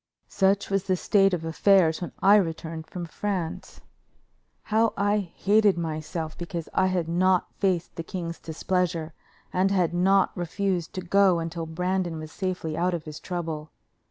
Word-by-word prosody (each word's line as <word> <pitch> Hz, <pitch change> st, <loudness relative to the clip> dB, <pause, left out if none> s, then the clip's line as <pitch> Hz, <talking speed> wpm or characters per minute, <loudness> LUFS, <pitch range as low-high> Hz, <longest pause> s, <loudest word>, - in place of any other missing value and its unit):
_ -, -, -30 dB
Such 195 Hz, +1 st, +2 dB
was 195 Hz, -1 st, +1 dB
the 185 Hz, -, +2 dB
state 195 Hz, +2 st, +3 dB
of 170 Hz, -3 st, -2 dB
affairs 165 Hz, 0 st, +3 dB
when 175 Hz, -, -4 dB
I 200 Hz, +2 st, +8 dB
returned 165 Hz, -3 st, -3 dB
from 175 Hz, -2 st, -6 dB
France. 180 Hz, -1 st, -4 dB, 0.8 s
How 220 Hz, +1 st, +1 dB
I 205 Hz, +1 st, +2 dB
hated 200 Hz, +2 st, +2 dB
myself 160 Hz, 0 st, -4 dB
because 170 Hz, -1 st, -5 dB
I 185 Hz, -, +3 dB
had 180 Hz, -3 st, 0 dB
not 180 Hz, +2 st, +2 dB
faced 185 Hz, -4 st, 0 dB
the 165 Hz, -, -3 dB
king's 170 Hz, -1 st, -5 dB
displeasure 165 Hz, 0 st, -2 dB, 0.4 s
and 185 Hz, +1 st, +2 dB
had 180 Hz, -4 st, +1 dB
not 190 Hz, +2 st, +3 dB
refused 175 Hz, 0 st, -2 dB
to 185 Hz, -, -4 dB
go 190 Hz, 0 st, +4 dB
until 165 Hz, 0 st, -4 dB
Brandon 180 Hz, +1 st, -1 dB
was 155 Hz, 0 st, -8 dB
safely 180 Hz, -4 st, -3 dB
out 180 Hz, +1 st, +1 dB
of 165 Hz, -, -5 dB
his 155 Hz, -1 st, -8 dB
trouble. 160 Hz, -4 st, -4 dB
180 Hz, 160 wpm, -26 LUFS, 165-195 Hz, 0.8 s, I